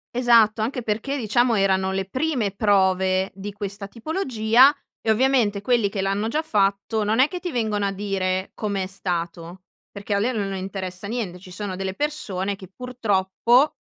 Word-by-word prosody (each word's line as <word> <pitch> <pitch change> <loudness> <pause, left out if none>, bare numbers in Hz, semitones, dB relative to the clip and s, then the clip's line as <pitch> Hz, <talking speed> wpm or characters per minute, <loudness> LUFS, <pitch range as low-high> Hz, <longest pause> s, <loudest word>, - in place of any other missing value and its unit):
Esatto, 230 -3 +4
anche 245 +2 -2
perché 225 +6 -2
diciamo 240 0 +2
erano 190 -1 +2
le 195 0 0
prime 255 -1 -1
prove 190 -2 +2
di 200 +1 -7
questa 200 0 -6
tipologia 255 - +3 0.2
e 220 - -3
ovviamente 220 -4 +2
quelli 235 -2 +2
che 195 -1 -3
l'hanno 195 +3 0
già 300 +7 0
fatto 205 -4 0
non 220 +3 +1
è 270 +3 +5
che 360 - -5
ti 355 - -4
vengono 220 -6 -1
a 195 - -1
dire 190 -1 -2
come 200 -3 -2
è - - -4
stato, 175 -1 -4 0.3
perché 200 0 -5
a 200 - +2
lei 245 +5 0
non 200 -3 -2
interessa 190 0 -5
niente. 200 -6 -4
Ci 185 0 -13
sono 190 -1 -5
delle 190 0 -3
persone 205 -9 -2
che 190 -2 -11
purtroppo, 235 +2 +1
205 Hz, 175 wpm, -23 LUFS, 190-240 Hz, 0.3 s, è